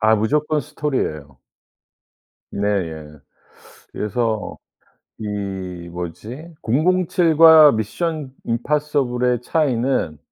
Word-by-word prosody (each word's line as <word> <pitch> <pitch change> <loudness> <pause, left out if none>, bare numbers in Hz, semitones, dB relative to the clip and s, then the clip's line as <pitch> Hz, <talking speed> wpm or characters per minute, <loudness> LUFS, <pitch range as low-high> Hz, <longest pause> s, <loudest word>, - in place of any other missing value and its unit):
아 110 0 +4
무조건 150 +7 0
스토리예요. 75 - -4 1.1
네예. 80 -8 -3 0.7
그래서 110 0 -2 0.6
이 95 -4 -5
뭐지. 105 - -7
007 165 +4 +1
과 160 -2 +9
미션 140 +6 -3
임파서블의 125 -1 0
차이는 125 - 0
120 Hz, 165 characters per minute, -20 LUFS, 100-150 Hz, 1.1 s, 과